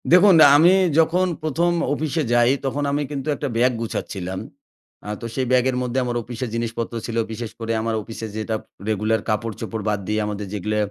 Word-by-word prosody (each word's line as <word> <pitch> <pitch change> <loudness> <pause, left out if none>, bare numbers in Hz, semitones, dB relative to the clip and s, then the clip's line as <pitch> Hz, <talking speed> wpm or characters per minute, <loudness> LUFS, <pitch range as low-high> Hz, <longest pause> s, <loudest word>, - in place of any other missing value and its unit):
দেখুন 180 +2 +7 0.2
আমি 170 +5 +6 0.3
যখন 170 +3 +3 0.2
১ম 165 +3 +1 0.2
অফিসে 155 +1 -1
যাই 120 +1 +5
তখন 140 +2 -1
আমি 145 +1 0
কিন্তু 140 0 -4
একটা 145 - -3
ব্যাগ 125 +2 +4
গুছাচ্ছিলাম। 95 -4 -4 0.7
আ - - -5
তো - - -5
সেই 130 - 0
ব্যাগের 130 0 +3
মধ্যে 125 +1 -1
আমার 120 -1 -2
অফিসে 120 +2 -5
জিনিসপত্র 115 0 -3
ছিল 115 -1 -4
বিশেষ 115 0 -5
করে 115 0 -3
আমার 115 0 -1
অফিসে 115 +1 -7
যেটা 110 +1 -2 0.3
রেগুলার 110 +1 +1
কাপড়-চোপড় 110 0 -3
বাদ 105 -1 0
দিয়ে 105 0 0
আমাদের 105 -1 -4
যেগুলো 105 +1 -2
120 Hz, 175 wpm, -22 LUFS, 110-140 Hz, 0.7 s, দেখুন